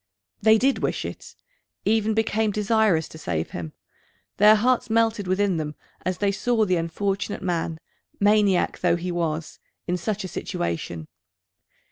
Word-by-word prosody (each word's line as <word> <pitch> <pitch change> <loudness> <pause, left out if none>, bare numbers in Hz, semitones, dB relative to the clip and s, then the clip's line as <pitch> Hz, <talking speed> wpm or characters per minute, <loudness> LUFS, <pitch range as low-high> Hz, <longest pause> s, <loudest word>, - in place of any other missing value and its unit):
They 220 +1 +6
did 265 +4 +2
wish - - -2
it, - - -8 0.5
even 220 0 +2
became 220 0 +1
desirous 210 -5 +2
to 160 - -11
save 80 - -3
him. 80 -3 -6 0.6
Their 210 +1 +7
hearts 245 +3 +1
melted 225 -3 +1
within 190 -1 +1
them 150 -1 -4 0.3
as 185 0 -1
they 200 -1 +1
saw 220 +3 +1
the 185 -2 +2
unfortunate 195 +4 -2
man, 170 -3 -2 0.4
maniac 205 -2 +3
though 175 -1 +3
he 175 +1 -3
was, 165 -2 -3 0.3
in 180 0 -1
such 210 +4 -3
a - - -4
situation. 85 - -4
195 Hz, 145 wpm, -24 LUFS, 170-215 Hz, 0.6 s, Their